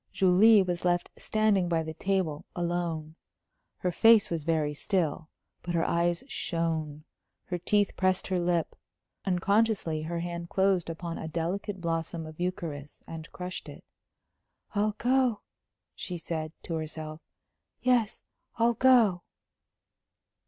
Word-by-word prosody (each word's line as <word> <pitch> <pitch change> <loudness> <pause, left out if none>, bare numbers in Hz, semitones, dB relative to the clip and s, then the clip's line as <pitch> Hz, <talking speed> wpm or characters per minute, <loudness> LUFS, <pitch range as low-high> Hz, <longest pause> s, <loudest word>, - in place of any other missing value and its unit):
Julie 195 +3 +6
was 175 -2 -3
left 175 -1 +1
standing 210 -5 +1
by 165 -1 +1
the 160 0 -5
table, 175 -3 -1
alone. 170 -2 -2 0.6
Her 180 - -1
face 225 +3 +6
was 165 -3 -2
very 155 -2 +1
still, 160 -1 -1 0.3
but 175 0 -3
her 165 - +2
eyes 170 0 +1
shone, 160 - -2 0.4
her 180 -1 -4
teeth 205 +3 +1
pressed 185 -1 +1
her 185 -1 0
lip. 175 -2 0 0.5
Unconsciously 195 -3 +1
her 170 +2 -3
hand 170 0 -5
closed 190 -3 +2
upon 165 0 -5
a 160 - -5
delicate 180 +5 -3
blossom 165 -1 -2
of 155 0 -11
eucharis 165 -5 -4
and 160 0 -8
crushed 180 0 -6
it. - - -11 0.9
"I'll 210 0 +1
go," 250 -2 +2 0.5
she 180 -2 -5
said, 160 -2 -4
to 170 - -5
herself. 155 0 -5 0.6
"Yes, 245 -4 +2 0.3
I'll 235 +1 +3
go." 230 -7 +5
175 Hz, 130 wpm, -29 LUFS, 160-195 Hz, 0.9 s, Julie